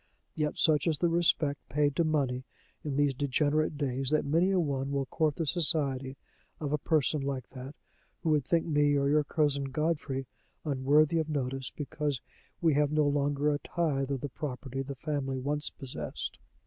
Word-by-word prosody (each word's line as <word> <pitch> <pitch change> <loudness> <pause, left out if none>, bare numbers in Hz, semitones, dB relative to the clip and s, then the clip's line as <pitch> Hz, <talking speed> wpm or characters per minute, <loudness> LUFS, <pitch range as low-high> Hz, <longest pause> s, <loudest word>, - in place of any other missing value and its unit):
Yet 150 -1 -1
such 155 -1 +3
is 160 -3 +2
the 170 +3 +2
respect 160 -4 +2
paid 145 +1 +1
to 170 - +3
money 135 -5 0 0.4
in 145 -3 -3
these 145 -1 +3
degenerate 145 +3 +1
days 135 -2 0
that 155 0 +2
many 165 +6 +3
a 190 -1 +2
one 140 -4 -1
will 140 -1 0
court 150 +3 0
the 165 - -2
society 140 -5 +2 0.4
of 150 -2 -2
a 150 - +1
person 150 -1 +1
like 135 -2 -3
that, 135 +2 -8 0.5
who 160 - +2
would 150 -2 +3
think 165 +3 +1
me 145 -2 +3
or 140 0 +2
your 150 +1 +4
cousin 145 -2 +1
Godfrey 140 -1 -1 0.4
unworthy 150 +3 +3
of 160 -1 -2
notice, 135 -3 -2
because 145 -2 -3 0.4
we 165 -3 +4
have 145 0 +2
no 150 -1 +3
longer 145 +1 +1
a 145 - -1
tithe 140 -4 -1
of 135 -3 -2
the 145 - -3
property 135 -1 -5
the 135 +1 -5
family 135 -2 -2
once 145 +3 -2
possessed." 75 - -6
145 Hz, 180 wpm, -30 LUFS, 135-155 Hz, 0.5 s, your